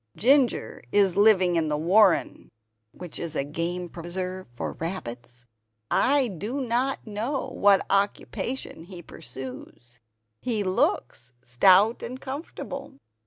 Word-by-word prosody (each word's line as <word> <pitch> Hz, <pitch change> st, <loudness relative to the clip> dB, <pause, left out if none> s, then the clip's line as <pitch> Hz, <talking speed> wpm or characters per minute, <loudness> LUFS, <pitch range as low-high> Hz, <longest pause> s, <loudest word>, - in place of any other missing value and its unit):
Ginger 260 Hz, +1 st, +2 dB
is 195 Hz, -3 st, +3 dB
living 190 Hz, -4 st, +4 dB
in 160 Hz, -1 st, +1 dB
the 150 Hz, -1 st, 0 dB
warren 185 Hz, +4 st, +3 dB, 1.0 s
[game 175 Hz, +3 st, -2 dB
preserve 185 Hz, +2 st, -5 dB
for 120 Hz, -, -5 dB
rabbits]. 120 Hz, -8 st, -7 dB, 0.5 s
I 275 Hz, -1 st, +3 dB
do 215 Hz, -, -4 dB
not 255 Hz, +1 st, -1 dB
know 230 Hz, +6 st, -3 dB
what 200 Hz, -1 st, +3 dB
occupation 200 Hz, 0 st, -2 dB
he 175 Hz, -1 st, -10 dB
pursues; 125 Hz, -3 st, -10 dB, 0.4 s
he 225 Hz, -5 st, -1 dB
looks 125 Hz, -9 st, -1 dB
stout 185 Hz, -, +4 dB
and 255 Hz, +2 st, -6 dB
comfortable. 275 Hz, -, -7 dB
190 Hz, 105 wpm, -26 LUFS, 165-230 Hz, 1.0 s, living